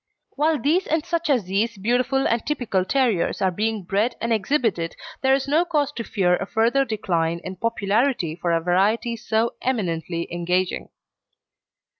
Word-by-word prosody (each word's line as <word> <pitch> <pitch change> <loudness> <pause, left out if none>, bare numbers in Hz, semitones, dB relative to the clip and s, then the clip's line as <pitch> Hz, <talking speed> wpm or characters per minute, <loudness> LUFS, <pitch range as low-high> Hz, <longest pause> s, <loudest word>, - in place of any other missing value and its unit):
While 305 +2 +1
these 335 +7 +1
and 315 0 0
such 340 -2 -1
as 255 -7 +3
these 205 +5 -1
beautiful 245 +6 +1
and 230 -1 0
typical 240 -10 -1
terriers 235 -4 +1
are 190 -2 +2
being 215 +2 -1
bred 205 +7 0
and 230 0 0
exhibited 215 - 0 0.3
there 265 0 +4
is 270 0 -2
no 305 +5 +3
cause 300 -5 0
to 235 - -5
fear 180 -5 +1
a 195 - -5
further 235 +6 +2
decline 170 -7 -1
in 185 - -6
popularity 220 - 0
for 170 0 -2
a 165 0 +2
variety 200 +7 +1
so 225 0 0
eminently 170 -8 -2
engaging. 180 +2 -1
225 Hz, 160 wpm, -23 LUFS, 185-265 Hz, 0.3 s, there